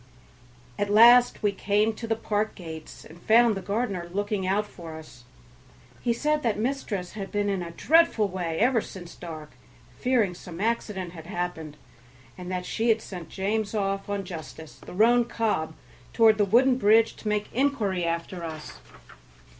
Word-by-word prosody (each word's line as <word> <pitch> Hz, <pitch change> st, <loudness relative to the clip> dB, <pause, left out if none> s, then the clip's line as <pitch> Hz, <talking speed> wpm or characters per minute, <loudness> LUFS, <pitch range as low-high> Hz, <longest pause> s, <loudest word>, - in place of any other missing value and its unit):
At 205 Hz, -, 0 dB
last 240 Hz, +3 st, +6 dB
we 205 Hz, -, +3 dB
came 205 Hz, +2 st, +1 dB
to 230 Hz, +2 st, -7 dB
the 225 Hz, -, +1 dB
park 215 Hz, -1 st, -2 dB
gates 160 Hz, -4 st, -9 dB
and 170 Hz, +2 st, -14 dB
found 230 Hz, +1 st, +5 dB
the 195 Hz, -, -4 dB
gardener 200 Hz, -3 st, -2 dB
looking 205 Hz, 0 st, -2 dB
out 205 Hz, +3 st, +1 dB
for 165 Hz, -5 st, -10 dB
us. 130 Hz, -6 st, -14 dB, 0.8 s
He 240 Hz, -, 0 dB
said 300 Hz, +6 st, 0 dB
that 230 Hz, -6 st, 0 dB
mistress 215 Hz, -6 st, -3 dB
had 195 Hz, -2 st, -7 dB
been 205 Hz, -1 st, 0 dB
in 195 Hz, -2 st, -1 dB
a 170 Hz, -, -5 dB
dreadful 250 Hz, -, +3 dB
way 175 Hz, -4 st, -3 dB
ever 240 Hz, +2 st, +3 dB
since 175 Hz, -4 st, -10 dB
dark, 155 Hz, -3 st, -9 dB, 0.5 s
fearing 240 Hz, -7 st, +2 dB
some 175 Hz, -1 st, -10 dB
accident 210 Hz, -4 st, -2 dB
had 165 Hz, -2 st, -10 dB
happened, 175 Hz, -5 st, -4 dB, 0.6 s
and 180 Hz, 0 st, -8 dB
that 180 Hz, -1 st, -3 dB
she 230 Hz, +4 st, -1 dB
had 225 Hz, 0 st, +4 dB
sent 180 Hz, -4 st, -8 dB
James 205 Hz, +2 st, -2 dB
off 195 Hz, -1 st, -2 dB
on 200 Hz, -1 st, -2 dB
Justice, 160 Hz, -2 st, -9 dB
the -, -, -11 dB
roan 235 Hz, +5 st, +4 dB
cob, 210 Hz, -10 st, -1 dB, 0.4 s
toward 220 Hz, -2 st, +5 dB
the 205 Hz, -, +4 dB
wooden 250 Hz, +5 st, +4 dB
bridge 225 Hz, +1 st, +4 dB
to -, -, -8 dB
make 210 Hz, 0 st, -1 dB
inquiry 225 Hz, -9 st, 0 dB
after 170 Hz, +1 st, -3 dB
us. 155 Hz, -2 st, -8 dB
205 Hz, 170 wpm, -26 LUFS, 175-225 Hz, 0.8 s, last